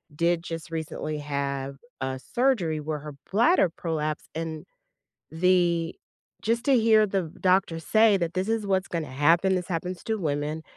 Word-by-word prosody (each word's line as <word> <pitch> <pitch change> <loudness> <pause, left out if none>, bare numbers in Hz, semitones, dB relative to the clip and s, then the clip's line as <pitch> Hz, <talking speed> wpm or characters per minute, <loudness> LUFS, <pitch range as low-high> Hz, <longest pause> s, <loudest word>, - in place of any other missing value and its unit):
did 170 +1 +1
just 165 -1 -6
recently 155 -1 -4
have 140 -1 -3 0.2
a 130 0 -2
surgery 225 - +2
where 150 0 -3
her 150 0 -8 0.2
bladder 230 - +4
prolapsed 155 -2 -3
and 160 -1 -4 0.7
the 170 -1 +2 0.5
just 230 +2 0
to 275 -2 +5
hear 220 -1 +5
the 195 -2 -1 0.2
doctor 185 -3 +2
say 215 +5 +4
that 170 -2 -2
this 185 +3 -1
is 225 -2 0
what's 190 -1 +1
gonna 165 -3 -3
happen, 165 +8 +3
this 180 -1 -3
happens 180 0 -4
to 220 -1 0
women, 150 -2 -2
170 Hz, 155 wpm, -26 LUFS, 155-195 Hz, 0.7 s, to